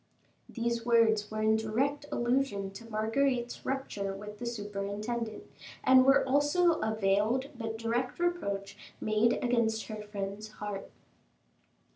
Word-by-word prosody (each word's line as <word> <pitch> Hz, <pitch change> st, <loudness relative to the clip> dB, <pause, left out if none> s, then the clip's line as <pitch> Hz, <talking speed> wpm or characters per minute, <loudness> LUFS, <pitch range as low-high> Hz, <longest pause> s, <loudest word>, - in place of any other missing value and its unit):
These 235 Hz, -1 st, -2 dB
words 225 Hz, -3 st, +3 dB
were 215 Hz, 0 st, -2 dB
in 220 Hz, 0 st, +4 dB
direct 265 Hz, +7 st, -1 dB
allusion 240 Hz, -5 st, 0 dB
to 230 Hz, +4 st, -11 dB
Marguerite's 240 Hz, +3 st, 0 dB
rupture 205 Hz, -8 st, -3 dB
with 210 Hz, +1 st, -9 dB
the 240 Hz, -, -4 dB
superintendent, 210 Hz, +1 st, -4 dB, 0.4 s
and 260 Hz, 0 st, +7 dB
were 270 Hz, 0 st, +5 dB
also 290 Hz, +5 st, +3 dB
a 220 Hz, 0 st, -1 dB
veiled 215 Hz, +6 st, +1 dB
but 225 Hz, -2 st, -4 dB
direct 235 Hz, +3 st, -1 dB
reproach 200 Hz, -, -1 dB, 0.2 s
made 215 Hz, +2 st, +3 dB
against 230 Hz, -3 st, +1 dB
her 215 Hz, -1 st, -5 dB
friend's 210 Hz, +1 st, -6 dB
heart. 205 Hz, -2 st, -6 dB
225 Hz, 125 wpm, -31 LUFS, 210-250 Hz, 0.4 s, and